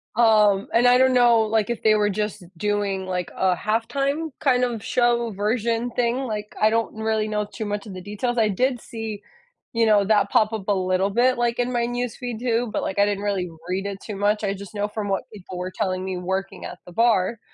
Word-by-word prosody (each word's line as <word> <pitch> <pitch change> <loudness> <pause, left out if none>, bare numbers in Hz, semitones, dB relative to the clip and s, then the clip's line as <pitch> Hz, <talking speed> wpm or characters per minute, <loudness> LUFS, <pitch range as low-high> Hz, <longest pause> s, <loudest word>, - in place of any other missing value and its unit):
Um, 210 -4 +4
and 240 +2 +5
I 245 - +6
don't 260 0 +4
know, 240 -2 +5
like, 220 0 +1
if 235 - -3
they 215 -1 +5
were 210 0 +2
just 210 0 -3
doing, 205 -1 -1
like, 180 -1 -3
a 185 -1 +2
halftime 275 - -1
kind 255 -5 +2
of 230 -4 -4
show 240 -2 +1
version 225 +3 -1
thing, 240 +1 0
like, 210 -3 -5
I 215 - +6
don't 230 0 0
really 220 -1 0
know 210 -1 -1
too 220 +2 -7
much 205 +1 -3
of 195 - -8
the 185 - -7
details, 210 +5 -3
I 215 -2 +3
did 250 +5 0
see, 220 -3 -6 0.5
you 230 -1 +2
know, 210 -2 +5
that 205 -1 +2
pop 215 0 +3
up 215 -3 -5
a 205 - +3
little 185 +1 +1
bit, 245 +4 +3
like, 240 0 0
in 245 +1 0
my 235 -1 0
newsfeed 245 -1 -4
too, 235 -1 0
but, - - 0
like, 190 - -3
I 200 - +6
didn't 205 0 -2
really 190 -4 -1 0.2
read 190 +2 -1
it 200 -1 -5
too 210 -3 -6
much, 210 +1 +1
I 195 -1 0
just 200 +2 -10
know 205 0 -1
from 210 -1 -4
what 195 -1 -1
people 190 -3 -9
were 180 +1 -4
telling 185 -3 -2
me 190 -1 -3
working 190 +2 -3
at 180 - -8
the 180 - -11
bar. 230 0 +2
215 Hz, 230 wpm, -23 LUFS, 200-235 Hz, 0.5 s, I